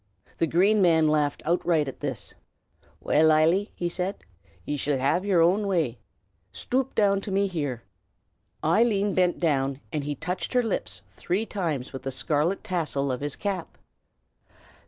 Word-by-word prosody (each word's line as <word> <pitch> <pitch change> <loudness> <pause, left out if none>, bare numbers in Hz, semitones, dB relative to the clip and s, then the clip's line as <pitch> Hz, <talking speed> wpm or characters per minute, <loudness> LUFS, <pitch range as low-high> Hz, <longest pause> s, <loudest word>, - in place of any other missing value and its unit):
The 165 - +2
Green 195 +6 +3
Man 165 -3 +4
laughed 150 -2 +1
outright 165 -2 +1
at 135 - -7
this. 135 -8 -4 0.7
"Well, 160 +1 +4
Eily," 165 +7 +3
he 175 - -2
said, 180 +3 -3 0.4
"ye 145 - -2
shall 145 0 0
have 145 +8 +1
yer 190 -4 +3
own 195 +5 +3
way. 160 -11 0 0.5
Stoop 260 - -2
down 200 -2 +3
to 200 - -7
me 195 +1 +2
here!" 145 -10 -3 0.8
Eileen 205 +3 +2
bent 180 -1 +2
down, 140 -4 0
and 150 -2 -1
he 145 +1 -3
touched 180 - -4
her 250 -1 +3
lips 110 - -3
three 185 - -2
times 160 - -3
with 135 - -6
the 135 - -4
scarlet 150 +7 0
tassel 155 -8 -1
of 125 - -3
his 145 -1 -2
cap. 195 -4 -4
165 Hz, 155 wpm, -26 LUFS, 145-195 Hz, 0.8 s, Man